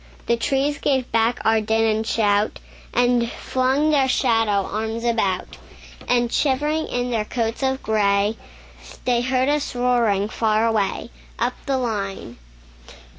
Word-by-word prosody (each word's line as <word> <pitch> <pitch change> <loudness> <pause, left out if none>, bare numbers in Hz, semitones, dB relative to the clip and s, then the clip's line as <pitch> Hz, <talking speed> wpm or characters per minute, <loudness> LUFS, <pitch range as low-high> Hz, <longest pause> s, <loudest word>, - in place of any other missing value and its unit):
The 235 - +2
trees 275 +4 0
gave 265 -3 0
back 230 +2 +1
our 220 0 +3
din 220 +1 +1
and 220 0 0
shout, 205 -2 +1 0.3
And 245 -1 +2
flung 265 +4 0
their 275 -3 +3
shadow 225 -6 +1
arms 220 +2 -3
about; 210 -6 -1 0.5
And 240 -1 +1
shivering 295 +3 0
in 245 0 -2
their 225 -3 0
coats 225 +2 -3
of 265 0 -1
gray, 205 0 +1 0.7
They 245 -1 +2
heard 255 +1 +1
us 290 -3 -1
roaring 235 -5 +2
far 220 0 +1
away, 220 0 -1 0.3
Up 240 +2 0
the 270 -1 +1
line. 200 - -4
235 Hz, 135 wpm, -22 LUFS, 215-255 Hz, 0.7 s, our